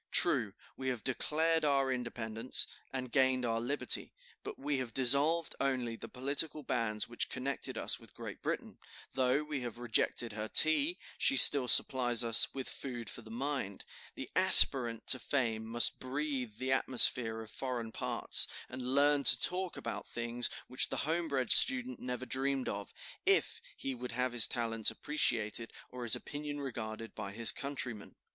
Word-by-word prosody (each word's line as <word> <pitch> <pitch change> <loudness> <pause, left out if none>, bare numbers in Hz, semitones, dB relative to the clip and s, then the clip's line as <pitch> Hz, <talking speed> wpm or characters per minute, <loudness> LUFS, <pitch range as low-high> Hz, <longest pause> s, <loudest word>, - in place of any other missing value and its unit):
True, - - +1 0.2
we 130 - -7
have 125 -4 -4
declared 160 +5 -1
our 135 -2 +1
independence, 120 -1 -1 0.3
and 130 -2 -6
gained 130 -2 +1
our 115 -1 -2
liberty, 140 +5 -1 0.3
but - - -8
we 140 0 -3
have 120 -3 -7
dissolved 140 +6 +3
only 130 -4 -2
the - - -10
political 145 +4 -2
bands 115 -4 -2
which 120 - -3
connected 135 +2 -3
us - - -2
with - - -16
Great - - -9
Britain; - - -5 0.3
though 130 +2 0
we 150 -3 -5
have 120 -2 -7
rejected 120 -1 0
her 110 0 -5
tea, 280 - +4 0.2
she 275 - +2
still 140 -3 +7
supplies 120 -2 +3
us 115 -1 +2
with 135 -1 -7
food 120 -6 -7
for - - -8
the 110 - -15
mind. 125 -4 -5 0.3
The - - -8
aspirant 120 -4 +7
to 130 - +3
fame 115 -6 -2
must 120 +1 0
breathe 130 -3 -5
the 130 0 -4
atmosphere 125 -3 +3
of 110 -1 -10
foreign 125 -4 -6
parts, - - +2 0.2
and 130 +1 -5
learn 145 0 +2
to - - +4
talk 185 0 -1
about - - -7
things 120 +1 -2 0.2
which 130 - +1
the - - -4
homebred 155 -5 -2
student 255 -1 +6
never 125 0 -6
dreamed 135 0 -2
of, 100 0 -6 0.4
if - - +1 0.2
he 135 - -5
would 125 -1 -8
have 125 +1 -2
his 120 -2 +7
talents 115 -3 -1
appreciated 115 -6 -2 0.2
or 125 -1 -7
his 115 - +2
opinion 145 0 -7
regarded 115 -4 -7
by 100 -2 -7
his 115 +1 +6
countrymen. 130 -7 -6
130 Hz, 165 wpm, -32 LUFS, 115-140 Hz, 0.4 s, still